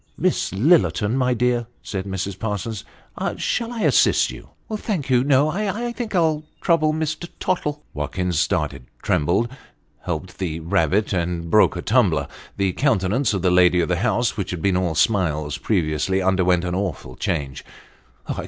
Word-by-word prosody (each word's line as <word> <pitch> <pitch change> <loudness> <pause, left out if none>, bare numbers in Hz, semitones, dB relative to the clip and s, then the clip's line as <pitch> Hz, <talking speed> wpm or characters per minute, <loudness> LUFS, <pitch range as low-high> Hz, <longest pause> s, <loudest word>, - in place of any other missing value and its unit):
" - - -40
Miss - - 0
Lillerton, 105 - +3
my 125 -1 +1
dear," 120 0 +1 0.2
said 95 -2 -4
Mrs. 95 0 -4
Parsons, 105 -1 -3 0.3
" - - -3
shall 235 0 -1
I 235 -2 -4
assist - - +3
you? - - -11
" - - -41
" 215 - -3
Thank 190 - -3
you, 125 -1 +4
no; 140 +2 +3
I 210 +6 -2
think 235 -4 -5
I'll 160 -3 +2 0.2
trouble 160 -3 +2
Mr. 155 +2 -3
Tottle." 150 -5 -2
Watkins 75 +3 -2
started 70 -4 -1 0.2
trembled 90 +10 +1 0.6
helped 90 +1 -4
the 85 -4 -2
rabbit 100 +4 +1
and 85 -2 -2
broke 105 -1 +5
a 85 - -4
tumbler. 95 - +2 0.3
The 95 -2 +1
countenance 110 -3 +1
of 95 - -2
the 90 - +3
lady 90 0 +5
of 85 - 0
the 90 - +1
house, 120 +3 +1
which 100 -3 -3
had 90 -3 -4
been 95 -2 +2
all 90 -3 0
smiles 75 -7 +1
previously, 90 -1 0
underwent 90 -2 +2
an 90 - -2
awful 90 -9 -3
change. 70 -5 -3
95 Hz, 170 wpm, -22 LUFS, 90-135 Hz, 0.6 s, broke